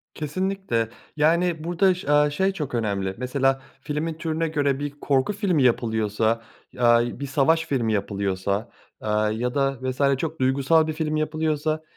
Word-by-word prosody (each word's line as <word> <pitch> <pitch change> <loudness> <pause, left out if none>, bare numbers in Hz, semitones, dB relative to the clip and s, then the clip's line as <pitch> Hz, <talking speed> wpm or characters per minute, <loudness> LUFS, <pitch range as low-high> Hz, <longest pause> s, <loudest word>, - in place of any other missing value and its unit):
Kesinlikle, 155 -7 -2 0.3
yani, 165 +1 +2
burada 180 +2 +3
ş 175 -5 -7
aaa, 150 0 +5
şey 190 +6 +1
çok 150 -8 -4
önemli. 100 -4 -1
Mesela, 135 +1 0 0.2
filmin 155 +2 -2
türüne 165 0 -2
göre 145 -3 0
bir 145 0 -3
korku 140 +7 +1
filmi 190 - +1
yapılıyorsa, 110 -1 +1 0.4
aaa, 120 0 +3
bir 140 - -3
savaş 160 +4 +2
filmi 115 -5 0
yapılıyorsa, 100 +1 -1 0.3
aaa, 105 0 +1
ya 120 +4 -2
da 135 -1 +1
vs. 135 +1 +1
çok 160 +2 -4
duygusal 140 +5 +3
bir 155 - -2
film 155 -1 -2
yapılıyorsa, 155 0 -1
140 Hz, 150 wpm, -24 LUFS, 120-160 Hz, 0.4 s, aaa